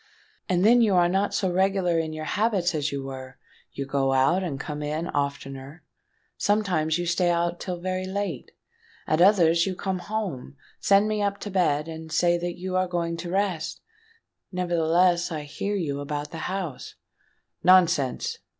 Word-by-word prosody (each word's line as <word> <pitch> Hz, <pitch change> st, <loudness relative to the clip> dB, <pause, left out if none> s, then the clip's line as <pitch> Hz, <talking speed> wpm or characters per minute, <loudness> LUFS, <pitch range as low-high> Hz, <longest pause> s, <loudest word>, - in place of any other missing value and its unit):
"And 180 Hz, +1 st, +2 dB
then 240 Hz, +2 st, +6 dB
you 210 Hz, -4 st, +3 dB
are 175 Hz, -1 st, +5 dB
not 195 Hz, +3 st, +1 dB
so 185 Hz, -3 st, 0 dB
regular 190 Hz, -2 st, +2 dB
in 160 Hz, -1 st, -2 dB
your 155 Hz, 0 st, -5 dB
habits 205 Hz, -4 st, +1 dB
as 150 Hz, -1 st, -1 dB
you 140 Hz, -1 st, -4 dB
were: 130 Hz, -1 st, -8 dB, 0.3 s
you 140 Hz, -, -5 dB
go 135 Hz, -1 st, 0 dB
out 135 Hz, +8 st, +3 dB
and 145 Hz, -7 st, -4 dB
come 150 Hz, 0 st, -5 dB
in 155 Hz, +3 st, -2 dB
oftener;—sometimes 155 Hz, +5 st, -3 dB
you 175 Hz, -, -2 dB
stay 175 Hz, +1 st, +1 dB
out 170 Hz, 0 st, 0 dB
till 180 Hz, -2 st, -4 dB
very 185 Hz, +1 st, -2 dB
late; 190 Hz, -8 st, -3 dB, 0.6 s
at 155 Hz, +2 st, +1 dB
others 170 Hz, -3 st, +5 dB
you 185 Hz, -, -2 dB
come 190 Hz, 0 st, -3 dB
home, 180 Hz, -10 st, -4 dB, 0.2 s
send 200 Hz, +1 st, +4 dB
me 215 Hz, -1 st, -1 dB
up 200 Hz, -1 st, 0 dB
to 205 Hz, -, -5 dB
bed, 160 Hz, -5 st, +1 dB
and 160 Hz, 0 st, -8 dB
say 175 Hz, +1 st, +3 dB
that 175 Hz, 0 st, -4 dB
you 185 Hz, +1 st, -5 dB
yourself 185 Hz, 0 st, +1 dB
are -, -, -18 dB
going 170 Hz, -1 st, -1 dB
to 170 Hz, +1 st, -6 dB
rest;—nevertheless, 180 Hz, -, -1 dB
I 155 Hz, -2 st, -3 dB
hear 175 Hz, +8 st, -4 dB
you 145 Hz, -7 st, -2 dB
about 145 Hz, +1 st, -4 dB
the 165 Hz, -, -6 dB
house——" 180 Hz, -8 st, -5 dB, 0.7 s
"Nonsense!" 175 Hz, -7 st, +3 dB
175 Hz, 170 wpm, -25 LUFS, 155-190 Hz, 0.7 s, then